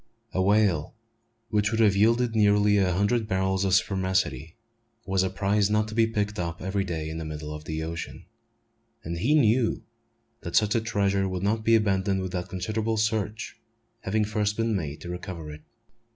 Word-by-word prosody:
A 95 - +1
whale, 100 -3 +2 0.5
which 105 -2 +1
would 110 +1 -1
have 105 -4 +4
yielded 115 +3 +3
nearly 105 -1 +4
a 95 -2 +2
hundred 105 +5 +1
barrels 95 0 0
of 95 -1 +3
spermaceti, 95 - 0 0.5
was 95 -1 +1
a 95 - 0
prize 100 +1 +1
not 105 0 +1
to - - -7
be 115 0 +3
picked 105 -2 -2
up 85 -1 -3
every 95 +2 -1
day 80 -4 -4
in 80 +1 -5
the - - -4
middle 75 -1 -6
of 75 0 -8
the 80 0 -3
ocean; 85 +1 -6 0.8
and 85 +1 -4
he 140 - +2
knew 120 -4 +2 0.6
that 85 - -5
such 105 -1 +3
a 115 - +1
treasure 100 -3 0
would 95 0 -4
not 110 +2 0
be 115 +1 +4
abandoned 95 -3 +1
without 90 0 -4
considerable 110 +4 -2
search 110 -1 -2 0.4
having 105 +2 0
first 105 -1 -1
been 115 -1 0
made 75 -6 -4
to 85 - -7
recover 90 -3 -6
it. 75 - -11
100 Hz, 180 wpm, -26 LUFS, 90-110 Hz, 0.8 s, have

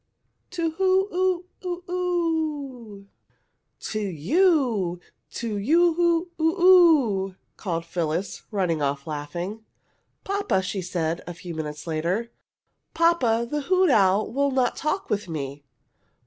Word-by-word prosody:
To 335 -3 -1
who 380 +3 +2
ooo 365 -1 +1 0.2
oo 360 -1 -4
oo?" 310 - -2 0.8
"To 215 - -3
you! 210 - +1 0.3
To 225 -3 -3
you 300 +12 +3
oo 340 +1 +1
oo 325 +4 +1 0.6
oo!" 190 -1 -5 0.2
called 170 -4 -3
Phyllis, 170 +2 -3
running 180 -7 0
off 140 0 -1
laughing. 170 +8 -5 0.6
"Papa," 400 - 0
she 190 +1 -3
said, 170 -2 -2
a 175 - -6
few 175 0 -8
moments 150 -2 -5
later. 175 +8 -2 0.6
"Papa, 250 -9 +2
the 295 +4 -2
hoot 370 +2 +3
owl 200 -1 +3
would 280 +2 +1
not 255 -2 +1
talk 305 +6 -2
with 205 -3 -1
me!" 145 -2 -5
225 Hz, 120 wpm, -25 LUFS, -, 0.8 s, you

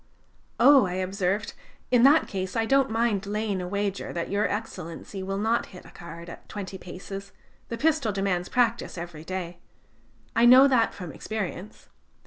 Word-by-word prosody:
"Oh!" 275 -8 +7
I 180 - -4
observed, 190 +2 -1 0.4
"in 245 -2 +5
that 285 +5 +6
case, 190 -1 -4
I 225 -1 +1
don't 270 +1 +3
mind 220 -3 0
laying 210 -2 -2
a 180 - -4
wager 200 +1 -2
that 170 +1 -3
Your 205 +1 +1
Excellency 195 -3 -6
will 195 +1 -3
not 225 +3 0
hit 180 - -12
the - - -15
card 170 0 -10
at 170 - -11
twenty 195 -2 -6
paces; 195 +2 -8 0.4
the 230 - -4
pistol 295 -4 +1
demands 195 -2 -1
practice 235 -5 0
every 170 -2 -7
day. 175 -1 -5 0.8
I 230 - +5
know 260 +3 +9
that 250 -4 +2
from 180 -4 -7
experience. 210 +3 -6
200 Hz, 165 wpm, -26 LUFS, 185-230 Hz, 0.8 s, know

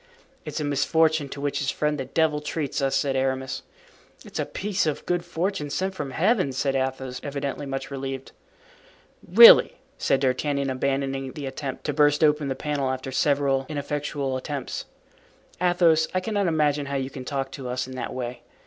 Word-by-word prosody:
"It's - - -4
a - - -2
misfortune, 150 +1 +2
to 140 - -7
which 145 0 -1
his 135 - -1
friend, 150 -1 -1
the 135 - -3
devil, 150 +2 +1
treats 150 -1 -3
us," 135 0 +1
said 135 0 +1
Aramis. 130 0 -1 0.6
"It's - - -7
a - - -1
piece 200 -3 -1
of 150 - -2
good 175 -1 0
fortune 175 -2 -2
sent 190 +6 -1
from 150 -7 -4
Heaven," 185 - +1
said 135 +1 0
Athos, 130 -1 -2
evidently 140 0 -4
much 135 +1 -4
relieved. 135 -1 -5 1.0
"Really!" 230 +5 +9 0.2
said 135 - +2
D'Artagnan, 140 +1 0
abandoning 135 0 -2
the 145 - -6
attempt 135 0 -5
to 145 - -1
burst 150 +1 +3
open 150 -1 +3
the 135 - -2
panel 145 -2 -2
after 130 0 -4
several 135 -1 +1
ineffectual 145 -2 -2
attempts, 140 0 -5 0.8
"Athos, 170 -3 +4
I - - +4
cannot 200 0 -1
imagine 150 -3 +1
how 140 - -3
you 135 0 -2
can 130 - -7
talk 135 0 -3
to 135 -2 -6
us 125 +1 -2
in 130 - -9
that 130 - -4
way. 120 -1 -5
140 Hz, 175 wpm, -25 LUFS, 135-155 Hz, 1.0 s, Really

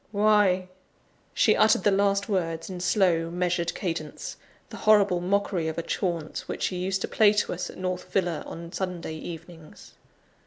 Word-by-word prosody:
why!" 205 -3 +3 0.6
She - - +3
uttered 215 -3 +4
the 205 - +4
last 200 0 +2
words 170 -4 -2
in 180 - -6
slow, 175 -3 +2
measured 175 -1 -1
cadence 165 -5 -4 0.4
the - - -7
horrible 200 -4 +5
mockery 190 -2 0
of 160 - -4
a 170 - -2
chaunt 170 -4 -2
which - - -4
she 185 - -1
used 190 +2 -1
to - - -2
play 210 -1 +4
to 210 - 0
us 180 - -4
at - - -11
North 185 0 -4
Villa, 175 -4 0
on 170 0 -8
Sunday 180 -4 -4
evenings. 165 0 -10
180 Hz, 165 wpm, -26 LUFS, 170-195 Hz, 0.6 s, horrible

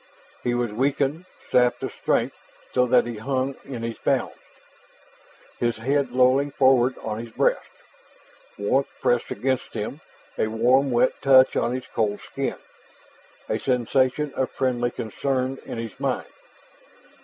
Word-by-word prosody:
He 120 0 0
was 120 -2 -1
weakened, 140 +7 0 0.3
sapped 125 -1 +3
of - - -2
strength, - - 0 0.4
so 125 0 +3
that 125 -1 +4
he 120 -2 -5
hung 130 +3 -1
in 125 -4 -6
his 115 -1 -4
bounds, - - 0 1.3
his 120 -2 0
head 135 +3 0
lolling 130 +3 +3
forward 130 -2 +3
on 110 -1 -3
his 115 0 -7
breast. - - +1 0.9
Warmth 130 +7 +1
pressed 120 -1 +1
against 130 -1 -2
him, - - -4 0.4
a - - +2
warm 125 +5 +3
wet 120 -1 +3
touch 130 -1 +6
on 120 +2 +1
his 130 - -5
cold 105 -2 -1
skin, - - -4 0.9
a - - -1
sensation 130 +3 +1
of 130 - -1
friendly 120 -2 0
concern 130 +3 -2
in - - -5
his 115 -2 -6
mind. - - -1
125 Hz, 140 wpm, -24 LUFS, 120-135 Hz, 1.3 s, touch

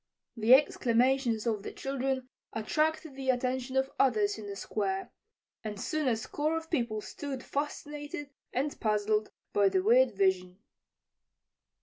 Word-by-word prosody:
The 230 +2 +7
exclamations 245 -3 +2
of 220 -3 0
the - - -6
children 265 -1 -2 0.3
attracted 310 +6 0
the 265 -1 -4
attention 255 +1 0
of 265 +1 +1
others 215 -5 +3
in 210 - -7
the 200 - -5
Square, 195 -1 -2 0.5
and 210 -2 -5
soon 310 +4 -1
a 240 - +3
score 300 +8 -1
of 325 0 -7
people 235 -8 0
stood 270 +2 -6
fascinated 290 0 -4 0.2
and 280 +3 -2
puzzled 215 0 +1 0.2
by 200 -1 +4
the 190 -1 +1
weird 240 +2 +5
vision. 185 -2 +1
250 Hz, 135 wpm, -30 LUFS, 215-275 Hz, 0.5 s, The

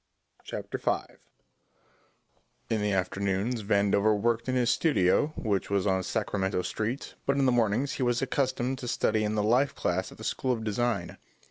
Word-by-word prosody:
Chapter - - -5
Five - - -2 1.5
In 110 -2 +1
the 105 0 0
afternoons 100 +4 -1
Vandover 100 +1 +2
worked 115 +2 0
in 130 - 0
his 125 -1 +3
studio, 120 - +3
which 100 -4 -1
was 100 -1 +1
on 95 -2 +2
Sacramento 95 -2 -1
Street, 115 +5 -3
but 140 0 +2
in 135 - +3
the 130 - +4
mornings 120 +3 +1
he - - -5
was 120 -1 +2
accustomed 130 -1 -1
to 125 - -6
study 110 -2 +1
in 105 0 -1
the 105 - +1
life 125 +6 +2
class 95 +2 -1
at - - -13
the - - -10
School 130 - -1
of 115 -2 -4
Design. 115 +3 -1
110 Hz, 170 wpm, -28 LUFS, 100-125 Hz, 1.5 s, the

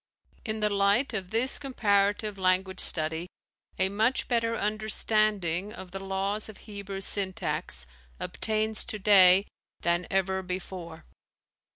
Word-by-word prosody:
In 220 -1 -3
the 210 - +3
light 200 +6 +2
of 190 -4 -3
this 230 +5 0
comparative 205 -6 +1
language 185 0 +1
study 160 +1 0 0.5
a 190 - +3
much 220 +6 +1
better 230 -1 +1
understanding 210 -3 0
of 185 -3 -10
the 195 - -5
laws 195 +3 -2
of 215 - -10
Hebrew 200 -2 -6
syntax 190 - -1 0.3
obtains 215 0 -1
today 195 -2 +6 0.4
than 175 +1 0
ever 190 0 0
before. 180 -3 -7
200 Hz, 115 wpm, -28 LUFS, 185-215 Hz, 0.5 s, today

